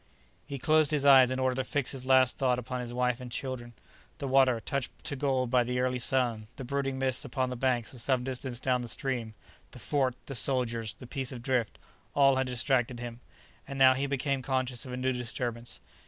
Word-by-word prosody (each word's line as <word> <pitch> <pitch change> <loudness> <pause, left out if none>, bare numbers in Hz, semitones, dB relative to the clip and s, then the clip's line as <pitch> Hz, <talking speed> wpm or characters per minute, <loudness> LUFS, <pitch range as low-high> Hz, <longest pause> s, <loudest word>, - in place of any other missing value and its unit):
He 140 -1 -4
closed 155 +2 +3
his 145 -2 0
eyes 135 -3 +8
in 130 - -2
order 130 -1 +1
to 130 - 0
fix 140 +1 -1
his 130 -1 -6
last 130 -1 +5
thoughts 130 -3 +2
upon 125 +1 -4
his 120 -1 -5
wife 125 0 0
and 125 -1 -8
children. 125 -1 -5 0.4
The 140 - -4
water, 130 -3 +4
touched 140 +2 -2
to 145 - -3
gold 130 -3 0
by 125 -1 +4
the 125 +1 -2
early 125 0 0
sun, 120 -4 0
the 135 - -7
brooding 135 +1 -2
mists 130 +1 0
under 130 -1 +1
the - - -3
banks 125 -2 0
at 125 - -7
some 125 +1 +1
distance 130 -1 -4
down 125 -1 +1
the 120 - -5
stream, 120 -3 -3 0.3
the - - -13
fort, 130 -4 0
the 135 - -6
soldiers, 115 -3 0
the - - -11
piece 130 +1 -3
of 120 -3 -8
drift—all 125 - 0
had 130 0 0
distracted 125 -1 0
him. 120 -1 -6 0.5
And 140 - -6
now 130 -1 +7
he 135 +2 -1
became 140 0 -1
conscious 130 -1 -2
of - - -7
a 125 - -4
new 130 +1 0
disturbance. 120 -1 -4
130 Hz, 215 wpm, -29 LUFS, 120-135 Hz, 0.5 s, eyes